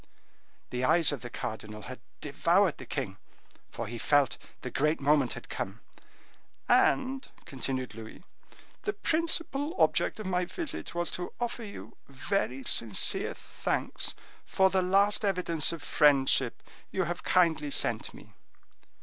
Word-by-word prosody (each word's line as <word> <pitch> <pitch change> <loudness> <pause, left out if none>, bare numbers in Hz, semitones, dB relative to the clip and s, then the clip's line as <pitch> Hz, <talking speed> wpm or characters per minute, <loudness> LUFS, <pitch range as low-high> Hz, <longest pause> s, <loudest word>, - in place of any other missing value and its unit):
The 125 0 -3
eyes 160 +4 +6
of 145 - -5
the 120 - -6
cardinal 110 -2 -6
had 130 0 -8 0.2
devoured 170 +5 +1
the - - -10
king, 115 -9 -4 0.5
for 115 - -6
he 115 +2 -7
felt 145 0 +2 0.2
the 125 - -6
great 150 +5 +1
moment 145 -2 +2
had - - -9
come. - - -5 0.9
"And," 265 0 +2 0.2
continued 130 -3 -4
Louis, 110 +8 -11 0.6
"the 405 - -2
principal 330 -4 0
object - - +2
of 215 - -6
my 180 -1 0
visit 305 - -5
was 175 0 0
to 180 - -5
offer 240 0 -3
you 205 -2 -10
very 135 -2 -2
sincere 115 -4 +4
thanks - - -3 0.3
for 190 0 +2
the 190 - +2
last 200 +4 +3
evidence 180 -6 +2
of 165 -3 -7
friendship 135 -5 +3 0.3
you 190 - -1
have 175 +1 -4
kindly 160 -5 +2
sent - - 0
me." - - -15
160 Hz, 140 wpm, -29 LUFS, 130-195 Hz, 0.9 s, eyes